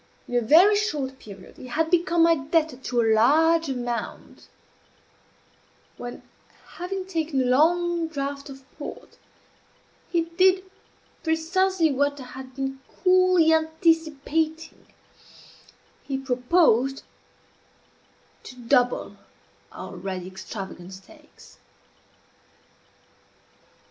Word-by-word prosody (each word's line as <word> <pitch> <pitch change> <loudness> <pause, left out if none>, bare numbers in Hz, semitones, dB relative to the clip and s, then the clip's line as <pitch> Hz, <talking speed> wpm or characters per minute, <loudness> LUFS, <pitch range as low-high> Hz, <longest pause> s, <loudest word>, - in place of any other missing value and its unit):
In - - -9
a 245 - +3
very 340 - +6
short 290 -11 -2
period 195 -3 -13
he 255 - -10
had 320 +6 -1
become 340 -1 +3
my 335 0 +6
debtor 310 -1 0
to 250 -2 -1
a 225 -1 +3
large 320 +8 +4
amount, 245 -2 -5 1.5
when, 245 0 -8 0.6
having 370 +1 -4
taken 325 -6 -2
a 260 - +1
long 335 +6 +2
draught 280 -2 -5
of 270 0 -11 0.2
port, 290 - -9 0.9
he 340 - +1
did 370 +3 +2 0.6
precisely 330 +1 +1
what 285 +1 0
I - - -7
had 260 +1 -11
been 270 0 -4 0.2
coolly 365 -3 +5
anticipating 320 0 0 1.1
he 270 - -4
proposed 265 0 +2 1.4
to 250 - -11
double 245 0 0 0.5
our - - -9
already 185 0 -5
extravagant 190 -1 -8
stakes. 300 +11 -17
295 Hz, 100 wpm, -24 LUFS, 250-330 Hz, 1.5 s, very